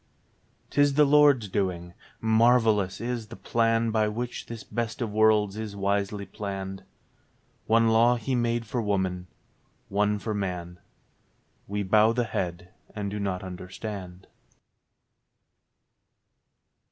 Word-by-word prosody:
'Tis 145 0 +3
the 150 0 +6
Lord's 145 -5 +5
doing. 90 -3 -2 0.3
Marvellous 110 -3 +3
is 120 -1 -3
the - - -10
plan 115 0 +1
By 110 -1 +2
which 120 +3 -4
this 115 -2 -7
best 115 -2 -4
of 115 -4 -2
worlds 105 -1 +3
is 110 -2 -5
wisely 100 0 -1
planned. 95 -1 -6 0.9
One 115 +1 +4
law 115 +2 +5
He 120 +3 -3
made 120 -1 0
for 120 +2 -2
woman, 95 -4 -1 0.6
one 105 +1 +1
for 110 +1 -4
man: 90 -3 -4 0.9
We 105 +1 -2
bow 105 +3 +4
the 120 0 +1
head 90 -4 -4 0.2
and 100 -2 -3
do 105 - -4
not 95 -2 -2
understand. 95 0 -7
105 Hz, 120 wpm, -27 LUFS, 95-115 Hz, 0.9 s, the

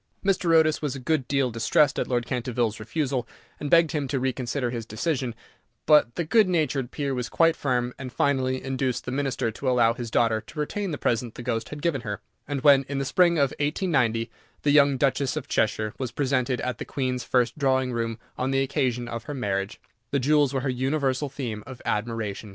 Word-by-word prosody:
Mr. 185 -3 +2
Otis 155 -1 +4
was 145 -3 -2
a - - -5
good 135 0 0
deal 135 -3 +1
distressed 115 +5 +2
at - - -1
Lord 120 -2 0
Canterville's 120 -3 -1
refusal, 130 0 -2 0.3
and 145 - -4
begged 165 -1 +5
him 145 -3 -1
to 135 0 -1
reconsider 125 0 -1
his 120 -2 -4
decision, 120 +2 -2 0.5
but 150 -6 +5
the 170 - -1
good 210 +4 +4
natured 150 -7 0
peer 140 0 -2
was 125 -2 -3
quite 165 0 +3
firm, 125 -2 -1
and 130 -2 -6
finally 130 -2 0
induced 130 -1 -2
the - - -4
Minister 135 -4 -1
to 130 +4 -3
allow 120 -2 +4
his 120 -1 -6
daughter 110 0 +2
to 150 - -11
retain 195 +6 -2
the 150 - -3
present 120 -2 -1
the 120 - -7
ghost 115 -2 -2
had 150 0 -8
given 160 -7 0
her, 105 -3 -4 0.3
and 145 -2 -2
when, 140 -1 +6
in 140 - -2
the 135 - -1
spring 170 +3 +3
of 140 -3 +3
1890, 135 - +1 0.3
the 145 - +3
young 140 -2 +5
Duchess 135 0 +1
of 145 -2 -4
Cheshire 110 -1 0
was 130 -3 -3
presented 130 -2 0
at 125 -3 -3
the - - -3
Queen's 130 -3 -2
first 125 -2 +1
drawing 130 -2 +2
room 115 -1 -2 0.2
on 130 - 0
the 135 0 +2
occasion 125 -3 -1
of 115 0 -6
her 145 - -5
marriage, 100 -4 -2 0.3
her 140 - +2
jewels 145 +1 +3
were 135 -2 -1
the 130 -1 -1
universal 135 +1 0
theme 120 -6 -5
of 130 -2 -9
admiration. 110 -1 -2
130 Hz, 210 wpm, -26 LUFS, 120-145 Hz, 0.5 s, when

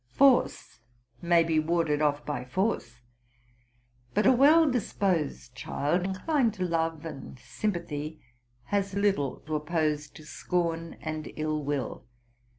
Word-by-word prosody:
Foree 275 -2 +6 0.7
may 170 -1 +4
be 165 -1 +1
warded 155 -2 +1
off 145 -1 +1
by 150 - -3
force; 125 - -2 1.1
but 210 - +2
a 260 - +7
well 300 +6 +6
disposed 185 - -1
child, 145 +7 -1
inclined 225 - 0
to 185 -2 -2
love 165 -2 -1
and 140 -4 -8
sympathy, 155 - -4 0.4
has 200 +4 -1
little 195 -10 0
to 155 - -7
oppose 150 -1 -1
to 155 - -14
scorn 165 0 -2
and 155 -1 -5
ill 155 -1 -2
will. 140 -4 -3
165 Hz, 125 wpm, -28 LUFS, 150-195 Hz, 1.1 s, a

